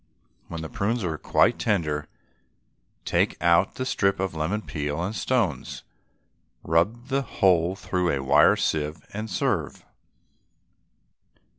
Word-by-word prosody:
When 85 -1 -6
the - - -4
prunes 115 0 -1
are 80 -4 -3
quite - - +2
tender 75 -8 0 1.0
take - - +1
out 85 +3 +3
the 130 - -3
strip 100 -6 +1
of 95 -2 -2
lemon 85 +7 -2
peel 75 0 -3
and 100 +5 -3
stones, 110 - -1 0.8
rub 105 - 0
the 135 0 +1
whole 90 -7 +2
through 90 -2 -1
a 70 -4 -1
wire 65 - +5
sieve, 75 0 -2
and 110 +2 -5
serve. - - -2
90 Hz, 125 wpm, -25 LUFS, 80-105 Hz, 1.0 s, wire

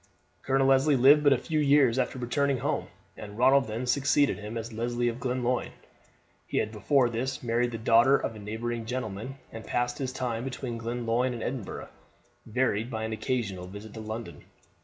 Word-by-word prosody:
Colonel 135 0 +2
Leslie 135 +2 +4
lived 140 +4 +6
but 145 - +5
a 135 - +5
few 155 +4 -2
years 140 -4 +4
after 130 +1 -1
returning 135 +3 0
home, - - -2 0.3
and 105 -1 -9
Ronald 130 +1 +4
then 110 +4 -3
succeeded 140 0 +2
him 105 +2 -6
as 115 0 -6
Leslie 120 +2 -1
of 115 +1 -5
Glenlyon. 125 -1 -1 0.7
He - - -3
had 110 - 0
before 125 +5 +2
this 125 +3 -3
married 120 +1 +1
the 115 - -5
daughter 115 +4 +5
of 115 - -4
a - - -9
neighbouring 110 +2 -4
gentleman, 125 0 -4 0.2
and 110 0 -8
passed 120 +2 -1
his 130 -2 -2
time 120 -3 -3
between 125 -2 -5
Glenlyon 120 +1 -1
and 115 - -5
Edinburgh, 125 -5 -5 0.6
varied 115 -1 0
by 110 -3 -4
an 110 0 -3
occasional 110 -6 -2
visit 100 +3 -10
to 110 - -8
London. 110 +2 -7
120 Hz, 180 wpm, -28 LUFS, 115-130 Hz, 0.7 s, lived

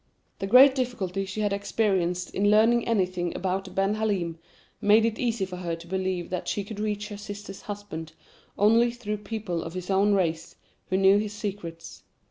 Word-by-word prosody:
The 195 - -2
great 260 +5 +8
difficulty 210 -8 -2
she 190 +3 -4
had 205 -1 +1
experienced 190 -4 0
in 205 +1 +2
learning 225 +3 +4
anything 185 -6 0
about 190 +1 -3
Ben 195 +1 +2
Halim 195 -7 -1 0.4
made 215 +2 +5
it 225 -1 -1
easy 230 -5 0
for 185 -1 -8
her 175 -2 -3
to 165 0 -12
believe 185 -1 -2
that 180 - -3
she 205 - -1
could 205 +1 -8
reach 210 0 -2
her 205 - -7
sister's 205 -1 -8
husband 195 -6 -7 0.4
only 225 +4 +5
through 230 -3 -4
people 210 -5 -4
of 165 +2 -7
his 185 +1 -4
own 200 +2 +3
race, 165 -4 -1 0.3
who 185 - +1
knew 195 +1 +5
his 210 0 -3
secrets. 190 -6 -6
200 Hz, 180 wpm, -26 LUFS, 180-215 Hz, 0.4 s, great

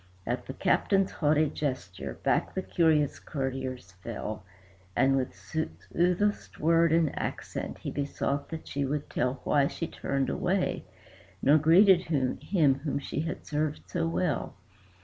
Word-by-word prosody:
At 120 +1 -2
the 130 - -5
Captain's 195 -1 +2
haughty 150 0 +2
gesture, 125 -11 -4
back - - +1
the 190 - -1
curious 155 -5 +2
courtiers 130 - -4
fell, 110 -2 -5 0.5
And 135 0 +4
with 130 -1 -1
soothest 170 - -1
word 165 +1 +4
and 160 -3 +2
accent - - -4
he - - -5
besought 140 0 -2
that 160 -1 -7
she 140 - -2
would 145 +2 -2
tell 125 +1 -1
Why 140 -2 +3
she 165 - -4
turned 135 -4 -2
away, - - 0 0.6
nor 150 +3 +6
greeted 180 +4 +6
him 140 0 +2
whom 145 0 -2
she 140 - -4
had 165 +2 -4
served 150 0 -1
so 165 -2 -1
well. 165 -2 -1
145 Hz, 140 wpm, -29 LUFS, 135-165 Hz, 0.6 s, nor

